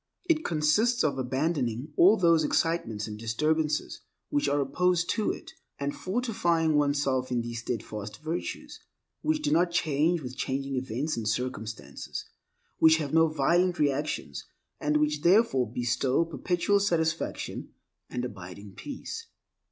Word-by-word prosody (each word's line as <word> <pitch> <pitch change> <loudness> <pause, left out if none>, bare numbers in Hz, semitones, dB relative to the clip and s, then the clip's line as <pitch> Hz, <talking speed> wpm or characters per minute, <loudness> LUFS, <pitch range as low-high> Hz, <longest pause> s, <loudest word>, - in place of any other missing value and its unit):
It 320 -2 +2
consists 180 +10 +2
of 140 -3 0
abandoning 130 0 -1
all 195 +6 +6
those 170 -4 +4
excitements 150 -10 0
and 105 -1 -7
disturbances 150 +7 0 0.3
which 290 -1 +1
are 145 - +1
opposed 175 +5 +1
to 215 - 0
it, - - -5 0.3
and 140 0 -3
fortifying 185 -7 0
one's 145 -1 +2
self 130 -2 0
in 120 -1 0
these 120 0 -5
steadfast 105 -3 -5
virtues, 160 +2 -4 0.4
which 310 0 0
do - - +1
not 170 +3 +4
change 165 -1 +1
with 125 0 -6
changing 135 +1 -2
events 130 +3 -2
and 110 -2 -3
circumstances, 110 -2 -4 0.5
which 160 0 +7
have 150 -3 -4
no 165 0 +6
violent 170 +4 +2
reactions, 145 - -1 0.3
and 150 0 +1
which 150 0 +1
therefore 170 - +3
bestow 125 +5 +1
perpetual 175 +4 +1
satisfaction 165 -4 -1 0.4
and 125 0 -3
abiding 95 -2 -9
peace. 375 - -7
150 Hz, 135 wpm, -28 LUFS, 125-170 Hz, 0.5 s, which